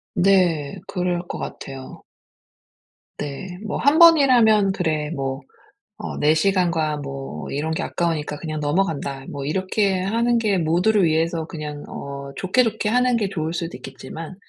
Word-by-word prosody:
네. 180 -4 +2
그럴 180 -1 -2
것 - - -5
같아요. 135 -1 -8 1.2
네. 175 +6 -6
뭐 215 - -3
1 285 +3 +3
번이라면 245 - +6
'그래 155 -5 -1
뭐 135 -3 -3 0.6
어 - - -6
내 150 +1 +4
시간과 170 -3 +1
뭐 135 - -6
이런 150 +3 -2
게 160 - -1
아까우니까 160 -3 -2
그냥 155 0 -5
넘어간다.' 145 -4 -1
뭐 140 -1 -5
이렇게 190 +4 0
하는 230 +5 +1
게 215 -4 +1
모두를 180 +5 +2
위해서 160 0 0
그냥 150 -2 -6
어 140 0 -7
좋게 190 - +2
좋게 220 -2 -1
하는 250 +1 +3
게 210 -4 0
좋을 160 -3 -3
수도 170 -1 -4
있겠지만 155 +6 -9
170 Hz, 280 characters per minute, -22 LUFS, 150-195 Hz, 1.2 s, 번이라면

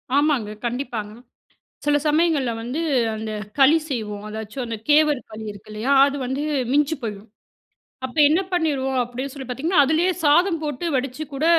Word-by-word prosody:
ஆமாங்க. 285 -7 +2 0.2
கண்டிப்பாங்க. 235 -4 -3 0.7
சில 295 0 +4
சமயங்கள்ல 300 -4 +2
வந்து 250 +7 -4 0.4
அந்த 220 0 -5 0.3
களி 280 +4 +7
செய்வோம். 210 -6 -4
அதாச்சும் 220 +4 -5
அந்த 230 -1 -4
கேவர் 300 -2 +5
களி 220 0 -7
இருக்கு 205 +1 -14
இல்லையா? 215 +6 -2 0.2
அது 280 - -3
வந்து 265 +3 -2 0.3
மிஞ்சி 295 +3 +2
போயிடும். 210 -2 -6 0.8
அப்ப 260 +2 -6
என்ன 320 +5 +3
பண்ணிருவோம் 280 -6 0
அப்படீன்னு 250 +3 -5
சொல்லி 270 -2 -7
பார்த்தீங்கன்னா, 290 +6 +2
அதுலயே 320 +6 +2
சாதம் 330 +4 +4
போட்டு 295 +1 -3
வடிச்சு 260 +3 -3
கூட 275 +3 -2
270 Hz, 150 wpm, -22 LUFS, 230-300 Hz, 0.8 s, களி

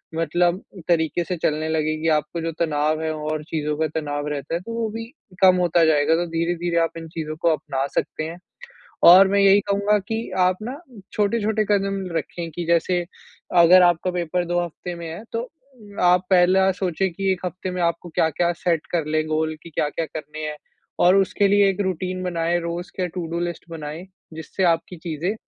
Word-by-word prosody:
मतलब 175 +3 +1 0.3
तरीके 165 0 +1
से 180 - -3
चलने 155 0 -1
लगेगी। 155 0 -1
आपको 155 +3 -4
जो 165 0 -2
तनाव 155 -1 0
है 160 - -1
और 155 0 -3
चीज़ों 150 -2 -2
का 160 0 +1
तनाव 145 -1 -4
रहता 145 +1 -4
है - - -1
तो 230 +5 -7
वो 230 -1 -1
भी 225 +1 -6 0.4
कम 185 -1 +7
होता 175 -1 +3
जाएगा, 155 0 +3
तो 175 +1 0
धीरे-धीरे 170 +1 -1
आप 165 - -1
इन 165 0 -7
चीज़ों 155 -1 -5
को 170 - +3
अपना 135 -3 -2
सकते - - -2
हैं। 165 +2 -7 0.7
और 190 +2 +9
मैं 200 +1 +2
यही 200 0 +6
कहूँगा 200 +1 +2
कि 225 +1 -3
आप 185 0 +3
ना 255 +6 -6 0.3
छोटे-छोटे 215 0 +1
कदम 195 -1 0
रखें 165 +2 -5
कि 170 +2 -5
जैसे 170 +1 +2 0.6
अगर 180 +2 +8
आपका 175 +1 +2
पेपर 175 0 -1
2 175 +1 0
हफ़्ते 175 +1 -7
में 170 -1 -7
है 170 +6 -7
तो 230 - -2 0.4
उम, 205 -1 -11
आप 180 +1 +4
पहला 190 +1 +4
सोचें 190 +1 0
कि 195 +2 0
1 185 0 -7
हफ़्ते 185 +1 -4
में 180 0 -3
आपको 170 +1 -1
क्या-क्या 165 +2 +1
सेट 165 -3 +1
कर 170 -3 0
लें 155 0 0
गोल 155 0 -1
कि 170 - -10
क्या-क्या 155 +1 -2
करने 155 0 -7
हैं। 150 - -7 0.4
और 180 +2 +5
उसके 195 +1 +2
लिए 200 0 +5
एक 195 - -3
रूटीन 185 -1 -2
बनाएँ 170 -1 0
रोज़ 170 +1 -5
के 185 -2 0
टू-डू 170 -1 -4
लिस्ट 175 -1 -4
बनाएँ 160 +1 -7 0.3
जिससे 160 +4 -4
आपकी 170 +1 +1
चीज़ें 165 +3 -3
170 Hz, 195 wpm, -22 LUFS, 160-185 Hz, 0.7 s, और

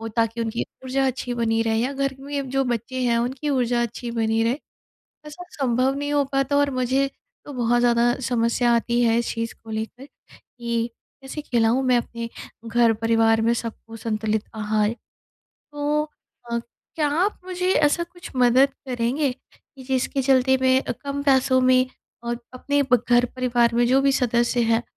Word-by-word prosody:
वो 225 - -5
ताकि 230 +1 -1
उनकी 230 0 -2 0.2
ऊर्जा 270 +1 0
अच्छी 250 -1 -2
बनी 225 -1 +1
रहे 225 -1 0
या 255 +4 0
घर 275 0 -1
में 280 -1 -4
जो 270 +1 +1
बच्चे 245 +1 -3
हैं 235 -1 +2
उनकी 260 +5 -2
ऊर्जा 245 -3 +1
अच्छी 235 +1 -4
बनी 225 0 +1
रहे। 240 +5 0 0.7
ऐसा 305 +4 -9
सँभव 260 0 +1
नहीं 290 +1 -3
हो 290 - +3
पाता 275 +1 +1
और 285 0 +3
मुझे 260 +2 +1 0.4
तो 290 - -9
बहुत 240 -1 +1
ज़्यादा 240 0 +3
समस्या 235 0 +2
आती 235 +1 +1
है 230 -1 +3
इस 235 - -1
चीज़ 230 0 -3
को 225 - -10
लेकर 220 +5 -5 0.3
कि 235 -1 -4 0.3
कैसे 270 +3 -6
खिलाऊँ 240 -1 +2
मैं 250 -1 +4
अपने 235 0 -5 0.4
घर 230 0 +4
परिवार 225 0 +3
में 230 +1 +3
सबको 225 -1 -6
संतुलित 215 -1 -2
आहार? 215 -1 0 0.6
तो 295 +1 -2 0.5
अ, 235 - 0 0.4
क्या 300 -2 +2 0.2
आप 415 - -2
मुझे 365 0 -1
ऐसा 305 +2 +3
कुछ 350 +1 -12
मदद 250 +2 +5 0.2
करेंगे 250 +4 0
कि 270 - -19
जिसके 265 +1 -1
चलते 265 0 +4
मैं 260 0 +3 0.2
कम 280 0 -3
पैसों 265 -2 +3
में 255 0 +4 0.4
और 235 0 -3 0.2
अपने 285 +3 0
ब 245 -2 +5
घर 240 0 +5
परिवार 240 -2 +2
में 240 0 +3
जो 260 +3 +4
भी 275 0 +3
सदस्य 240 -1 +1
हैं 225 +1 +2
245 Hz, 175 wpm, -23 LUFS, 230-270 Hz, 0.7 s, मदद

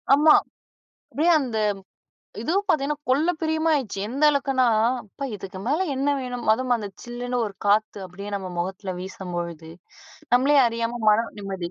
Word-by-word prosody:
ஆமா 305 +1 +6 0.8
அப்டியே 320 +7 +3
அந்த 240 -5 -3 0.8
இதுவும் 385 - 0
பார்த்தீங்கன்னா, 295 -3 +1
கொள்ள 300 +7 +3
பிரியமா 315 0 +1
ஆயிடுச்சு. 235 -9 -3
எந்த 275 +5 -2
அளவுக்குனா, 270 -3 +1 0.4
அப்பா 245 +7 -7
இதுக்கு 190 -1 -8
மேல 315 +7 +1
என்ன 275 +2 0
வேணும், 245 -1 -5
அதுவும் 250 +1 0
அந்த 210 -3 -5 0.2
சில்லுனு 245 +1 -4
ஒரு 200 - -10
காத்து 210 0 +2
அப்டியே 200 +3 -8
நம்ம 190 -1 -7
மொகத்தில 190 +1 -3
வீசும்பொழுது 175 -4 -6 0.6
நம்மளே 275 +4 +4
அறியாம 230 +1 -2
மனம் 225 +2 +1
நிம்மதி 190 -3 -5
240 Hz, 145 wpm, -24 LUFS, 195-280 Hz, 0.8 s, ஆமா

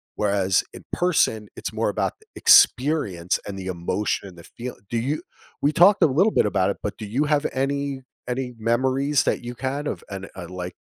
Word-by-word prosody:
whereas 100 -3 +2
in - - -12
person, 115 - +1
it's - - -5
more - - 0
about - - -1 0.2
experience, 115 - +4
and 100 -1 -5
the 95 - -6
emotion, 95 +3 -2
and 90 - -16
the 85 - -12
feel. 125 +7 -8
Do 120 - -1
you 135 +7 -1 0.4
we 145 - +3
talked 190 +5 +6
a - - +7
little 175 +11 +3
bit - - +3
about 100 -2 +1
it, - - -6
but 105 - -3
do 110 - -6
you 125 +9 0
have 150 0 +1
any 140 0 -2 0.2
any 125 0 -3
memories 130 +5 +1
that - - -1
you 120 +1 -6
had 140 +3 -2
of - - -4
and, 95 -1 -7
uh, 90 -2 -7
like, 90 -1 -6
120 Hz, 200 wpm, -24 LUFS, 100-140 Hz, 0.4 s, a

